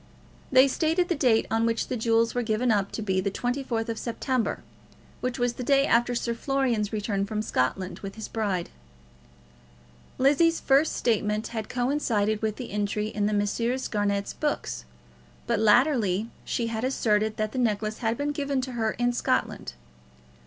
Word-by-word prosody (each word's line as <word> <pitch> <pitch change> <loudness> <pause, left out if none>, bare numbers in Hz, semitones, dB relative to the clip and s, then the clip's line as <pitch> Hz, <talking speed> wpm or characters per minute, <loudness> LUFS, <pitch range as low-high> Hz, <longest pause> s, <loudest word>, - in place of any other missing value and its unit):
They 260 +1 +7
stated 325 +5 +1
the 350 - +2
date 245 -6 +3
on 225 0 +2
which 230 -1 0
the - - -2
jewels 230 0 +2
were 245 - 0
given 230 +1 +1
up 200 -2 +1
to 220 - -3
be 190 -2 +1
the 200 - 0
24th 245 0 -2
of 230 -1 -3
September, 250 +1 -2 0.6
which 250 -1 -2
was 245 -1 +1
the 250 - -6
day 275 +2 +4
after 240 0 +2
Sir 235 0 -1
Florian's 240 -4 0
return 205 -2 -1
from 215 +1 -2
Scotland 185 +3 -1
with 195 -1 -7
his 220 -1 -6
bride. 200 -6 -2 1.5
Lizzie's 310 +5 +4
first 280 +3 +3
statement 215 -1 0
had 220 -2 -5
coincided 240 -5 0
with 215 -1 -1
this 245 0 -7
entry 210 +1 -1
in 210 -1 -1
the - - 0
Messrs. 230 +5 0
Garnett's 200 -1 -1
books; - - -3 0.6
but - - 0
latterly 220 -3 +3
she 235 - -1
had 230 0 -3
asserted 215 -4 +1
that 215 0 -1
the 255 - -3
necklace 215 -2 0
had 225 -1 0
been 290 +1 -1
given 280 -2 -1
to 255 0 -5
her 225 -3 -1
in 245 0 0
Scotland. - - -1
230 Hz, 170 wpm, -26 LUFS, 210-255 Hz, 1.5 s, They